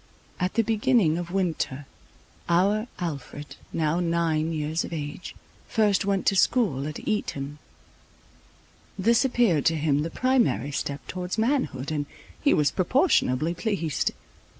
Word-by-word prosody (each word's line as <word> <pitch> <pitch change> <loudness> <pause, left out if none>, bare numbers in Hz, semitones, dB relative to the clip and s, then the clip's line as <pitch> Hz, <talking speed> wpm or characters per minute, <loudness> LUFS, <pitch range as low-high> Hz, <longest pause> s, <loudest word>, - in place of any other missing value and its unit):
At 180 0 -1
the 230 - +3
beginning 215 -6 +2
of 175 -1 -5
winter 165 -7 -2 0.6
our 200 +6 +2
Alfred, 145 -4 -6 0.2
now 160 +1 0
nine 165 -2 0
years 155 +1 -1
of - - -7
age, 150 +1 -6 0.3
first 210 -4 +2
went 195 -1 0
to 195 - +3
school 185 - +2
at 155 - -7
Eton. 145 -9 -2 1.4
This 230 +5 +3
appeared 235 - +2
to 165 - +3
him 145 -1 +1
the 160 - -2
primary 255 - +1
step 140 0 -4
towards 180 +2 -4
manhood, 220 - 0
and 145 -2 -2 0.3
he 290 - +3
was 150 -1 +3
proportionably 170 - +2
pleased. 180 - -1
170 Hz, 130 wpm, -26 LUFS, 150-210 Hz, 1.4 s, the